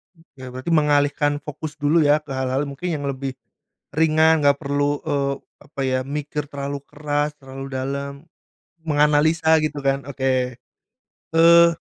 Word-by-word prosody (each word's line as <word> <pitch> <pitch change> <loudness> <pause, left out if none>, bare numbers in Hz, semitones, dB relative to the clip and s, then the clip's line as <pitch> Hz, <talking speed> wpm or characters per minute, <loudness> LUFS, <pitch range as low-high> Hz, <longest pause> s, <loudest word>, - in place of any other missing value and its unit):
Oke, 140 -6 -14
berarti 130 +6 -5
mengalihkan 145 -1 +2
fokus 150 +1 -7
dulu 150 +3 +2
ya, 150 0 +3
ke 145 - -11
hal-hal 130 +1 -1
mungkin 140 +5 -5
yang 145 - -5
lebih 135 -1 -3 0.6
ringan 160 0 +3
enggak 140 0 +5
perlu 145 0 0
e 160 -3 -2 0.5
apa 140 -2 -8
ya, 130 0 +1
mikir 150 0 -4
terlalu 140 0 -4
keras, 150 0 -2
terlalu 135 0 -8
dalam, 140 +2 -3 0.7
menganalisa 155 +2 +3
gitu 150 -2 -2
kan. 135 0 0
Oke, 130 -2 -1 0.8
eee, 170 +1 +7
145 Hz, 135 wpm, -22 LUFS, 135-150 Hz, 0.8 s, eee